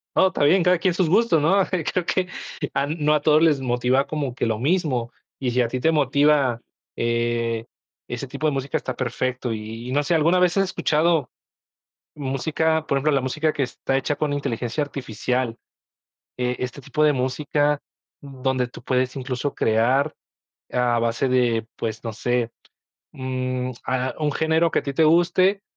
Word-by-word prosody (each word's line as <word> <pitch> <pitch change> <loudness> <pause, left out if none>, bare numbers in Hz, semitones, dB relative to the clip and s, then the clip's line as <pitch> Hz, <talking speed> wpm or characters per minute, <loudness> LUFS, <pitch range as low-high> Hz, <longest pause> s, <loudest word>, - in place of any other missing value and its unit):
Oh, 190 - +5
está 165 - -1
bien, 180 +6 +5
cada 180 0 +4
quien 175 +1 +1
sus 175 -3 +1
gustos, 185 -6 +3
¿no? 190 +5 +3
Creo 180 0 -1
que 185 -1 0 0.5
a 140 0 +1
no 150 0 +1
a 150 - +2
todos 155 +1 +4
les 150 -5 +3
motiva 125 +2 +1
como 140 -5 -3
que - - -1
lo 110 -1 -1
mismo, 135 -6 0 0.3
y 125 -2 -1
si 125 +1 +2
a 115 - 0
ti 130 - -3
te 160 +5 +3
motiva, 140 -3 +3 0.4
eh, 115 -1 0 0.5
ese 125 +2 -4
tipo 140 +4 -5
de 150 - +3
música, 135 0 -3
está 130 - -1
perfecto, 125 -1 -2
y 110 +2 -7
y - - -4
no 145 +1 +2
sé, 170 - 0
¿alguna 165 +3 +3
vez 180 +1 +2
has 195 - +4
escuchado 165 -4 +1 0.9
música, 155 +3 -1
por 140 - +1
ejemplo, 150 +3 +1
la 135 -2 +2
música 155 +4 0
que 145 - -2
está 135 +1 -1
hecha 145 +2 -1
con 145 0 -1
inteligencia 135 0 -2
artificial? 125 -2 -2 0.8
Eh, 125 0 -1
este 125 +2 -5
tipo 150 +4 -1
de 150 -1 +5
música 145 +3 0 0.4
donde 130 -2 -2
tú 120 - -12
puedes, 130 0 0
incluso, 130 +1 -3
crear 125 +7 +2 0.6
a 120 -1 +2
base 115 +3 0
de, 120 -3 +1
pues, 115 +1 -4
no 115 - -3
sé. 120 +1 -1 0.6
Mm, 130 -1 -3 0.2
ah, 130 0 -1
un 150 -2 0
género 160 +2 +2
que - - +1
a - - -15
ti 140 - -3
te 160 +3 +3
guste 180 +5 +3
135 Hz, 180 wpm, -23 LUFS, 125-155 Hz, 0.9 s, Oh